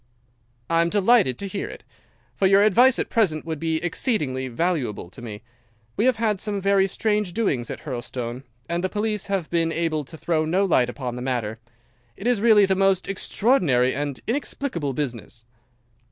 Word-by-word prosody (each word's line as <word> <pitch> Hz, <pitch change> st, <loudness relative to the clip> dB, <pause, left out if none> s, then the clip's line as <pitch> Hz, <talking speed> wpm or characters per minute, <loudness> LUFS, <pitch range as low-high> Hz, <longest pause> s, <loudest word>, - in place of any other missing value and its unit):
"'I 165 Hz, 0 st, +4 dB
am 170 Hz, -, +1 dB
delighted 205 Hz, -, +3 dB
to 200 Hz, -, -5 dB
hear 195 Hz, +1 st, -4 dB
it, -, -, -10 dB, 0.5 s
for 195 Hz, -, +3 dB
your 195 Hz, +1 st, +5 dB
advice 240 Hz, +5 st, +5 dB
at -, -, -1 dB
present 180 Hz, -10 st, +1 dB
would 160 Hz, -2 st, -4 dB
be 160 Hz, 0 st, -1 dB
exceedingly 150 Hz, -, -1 dB
valuable 130 Hz, -, -2 dB
to -, -, -12 dB
me. 110 Hz, -3 st, -8 dB, 0.5 s
We 215 Hz, -, +1 dB
have 255 Hz, -1 st, +4 dB
had 215 Hz, -3 st, 0 dB
some 205 Hz, -2 st, -1 dB
very 195 Hz, 0 st, +3 dB
strange 210 Hz, -1 st, -1 dB
doings 140 Hz, -, -1 dB
at -, -, -6 dB
Hurlstone, 125 Hz, -2 st, -5 dB, 0.3 s
and 170 Hz, +1 st, -2 dB
the 185 Hz, -, 0 dB
police 210 Hz, 0 st, -2 dB
have 195 Hz, -5 st, -1 dB
been 165 Hz, -1 st, +1 dB
able 160 Hz, -2 st, -1 dB
to 160 Hz, -, -12 dB
throw 160 Hz, -1 st, 0 dB
no 180 Hz, +5 st, +1 dB
light 125 Hz, -9 st, +3 dB
upon 125 Hz, -1 st, -5 dB
the -, -, -5 dB
matter. 120 Hz, -4 st, -2 dB, 0.6 s
It 195 Hz, -, -9 dB
is 245 Hz, -4 st, +2 dB
really 215 Hz, -3 st, +6 dB
the 190 Hz, -, +2 dB
most 195 Hz, -1 st, +2 dB
extraordinary 180 Hz, -, +2 dB
and 145 Hz, -1 st, -3 dB
inexplicable 230 Hz, -, -2 dB
business. 120 Hz, -4 st, -5 dB
170 Hz, 180 wpm, -24 LUFS, 130-205 Hz, 0.6 s, really